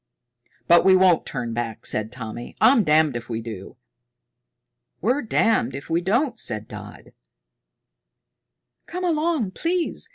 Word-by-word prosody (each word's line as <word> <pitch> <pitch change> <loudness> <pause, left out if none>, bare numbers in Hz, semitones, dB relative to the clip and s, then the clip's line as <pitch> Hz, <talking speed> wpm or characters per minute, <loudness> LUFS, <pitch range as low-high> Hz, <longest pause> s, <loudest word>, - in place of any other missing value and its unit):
"But 170 0 +6
we 190 0 +6
won't 185 -2 +4
turn 120 -4 -4
back," 115 -2 -4
said 110 +1 -1
Tommy. 120 -1 -8
"I'm 255 -4 +5
damned 155 -4 +3
if 120 0 -6
we 115 -1 -3
do." 110 -4 -9 1.2
"We're 250 +9 +1
damned 220 - +1
if 140 +4 -8
we 170 +1 +2
don't," 240 - 0
said 105 0 -3
Dodd. 105 -1 -11 1.7
"Come 360 +2 -5
along 310 - 0
please!" 340 - -2
165 Hz, 130 wpm, -23 LUFS, -, 1.7 s, But